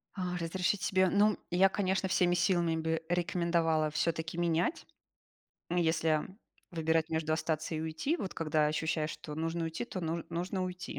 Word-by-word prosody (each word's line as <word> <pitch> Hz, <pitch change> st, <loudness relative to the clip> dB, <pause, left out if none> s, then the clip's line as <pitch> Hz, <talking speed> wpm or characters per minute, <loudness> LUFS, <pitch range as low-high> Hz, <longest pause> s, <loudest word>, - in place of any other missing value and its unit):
А, 180 Hz, -2 st, -2 dB
разрешить 180 Hz, +3 st, -1 dB
себе, 190 Hz, 0 st, +3 dB
ну, 205 Hz, +2 st, +3 dB
я, 190 Hz, +2 st, +5 dB
конечно, 190 Hz, -1 st, 0 dB
всеми 175 Hz, -1 st, +3 dB
силами 170 Hz, -2 st, +2 dB
бы 160 Hz, 0 st, -1 dB
рекомендовала 170 Hz, -3 st, +1 dB
всё-таки 165 Hz, +2 st, -1 dB
менять, 175 Hz, -, 0 dB, 0.9 s
м, 175 Hz, -, 0 dB
если 160 Hz, -2 st, +2 dB, 0.4 s
выбирать 160 Hz, -1 st, +1 dB
между 160 Hz, -1 st, 0 dB
остаться 160 Hz, 0 st, -1 dB
и 155 Hz, -, -2 dB
уйти. 160 Hz, -, -1 dB
Вот 195 Hz, -, -5 dB
когда 155 Hz, -1 st, +1 dB
ощущаешь, 155 Hz, 0 st, -1 dB
что 150 Hz, -, -7 dB
нужно 165 Hz, +2 st, -2 dB
уйти, 165 Hz, +7 st, -3 dB
то 200 Hz, -, -6 dB
н 165 Hz, 0 st, -2 dB
нужно 180 Hz, +3 st, -2 dB
уйти, 180 Hz, 0 st, -6 dB
170 Hz, 160 wpm, -32 LUFS, 160-180 Hz, 0.9 s, я